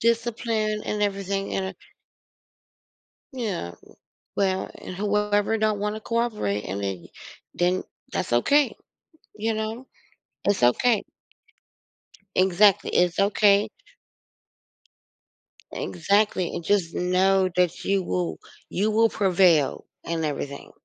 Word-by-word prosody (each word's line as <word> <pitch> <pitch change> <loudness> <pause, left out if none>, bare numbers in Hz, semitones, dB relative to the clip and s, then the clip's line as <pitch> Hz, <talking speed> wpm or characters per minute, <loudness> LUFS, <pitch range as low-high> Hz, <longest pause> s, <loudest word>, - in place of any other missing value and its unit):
Discipline 225 -2 0
and 210 0 -2
everything 195 -1 -2
and 190 - -1
a 190 - -6 1.6
Yeah. 210 - -3
W - - -19 0.4
well, 190 -1 0
and 185 - -8
whoever 210 +1 +1
don't 215 -1 +1
wanna 210 +1 -2
cooperate 215 - -1
and 100 +2 -4
then 95 -3 -4 0.5
then, 180 +1 +1 0.3
that's 175 - -2
okay, 280 - +3 0.6
you 220 +1 -1
know? 220 +4 -4 0.6
It's 200 -9 +1
okay. 210 - +3 1.3
Exactly, 190 +2 +4
it's 175 -1 +2
okay. 200 0 +4 2.0
Exactly, 200 +1 +1
and 170 - -5
just 185 -3 +1
know 185 +1 +2
that 180 -2 +1
you 195 -1 +1
will 90 - -2 0.3
you 210 +4 +1
will 225 +1 +3
prevail 180 -7 +3 0.2
in 165 -1 -2
everything, 140 -1 -4
195 Hz, 105 wpm, -25 LUFS, 175-215 Hz, 2.0 s, Exactly